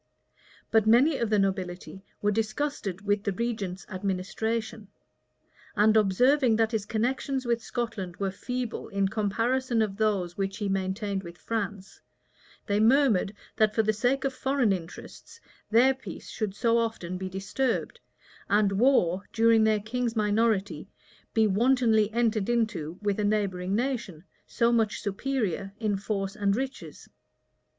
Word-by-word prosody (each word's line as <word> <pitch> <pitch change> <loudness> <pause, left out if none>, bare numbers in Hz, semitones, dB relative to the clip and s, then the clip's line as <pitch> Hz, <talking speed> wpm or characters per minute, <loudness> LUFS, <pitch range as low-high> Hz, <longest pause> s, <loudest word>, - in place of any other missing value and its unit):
But 220 -1 +3
many 265 +7 +5
of 235 - 0
the 215 - +3
nobility 190 -1 -2 0.2
were 205 - +3
disgusted 215 -2 -2
with 205 0 0
the 200 - 0
regent's 200 -4 -3
administration; 210 +3 -3 0.9
and 215 +1 +4
observing 240 +5 +4
that 225 0 +2
his 215 -3 -2
connections 260 +4 -1
with 235 -1 0
Scotland 215 -9 -4
were 195 -1 -1
feeble 250 +4 -4
in 195 -1 0
comparison 230 +4 0
of 210 -3 0
those 200 -5 0
which 195 0 -3
he 210 - -2
maintained 195 +1 -2
with 170 -1 -10
France, 200 -3 -5 0.6
they 205 0 +1
murmured 225 -4 +3 0.2
that 215 -1 +3
for 220 - +3
the 215 0 +1
sake 250 +5 0
of 270 - 0
foreign 260 -5 +1
interests, 185 - -9 0.3
their 245 +4 +5
peace 265 - -10
should 210 -3 -3
so 230 +1 +2
often 185 -6 -3
be 190 0 -4
disturbed 195 +7 -2 0.5
and 205 -1 +3
war, 195 -4 +2
during 225 -1 +4
their 215 -1 +3
king's 235 +2 -2
minority, 210 -1 0 0.5
be 220 -1 +4
wantonly 220 0 +3
entered 225 -2 0
into 210 -9 -1
with 205 0 0
a - - +1
neighboring 200 -3 0
nation, 235 - -2 0.2
so 235 0 +1
much 225 -2 +1
superior 205 -3 -2
in 215 -3 0
force 195 0 -3
and 200 -1 +1
riches. 265 +3 -6
215 Hz, 145 wpm, -27 LUFS, 195-235 Hz, 0.9 s, many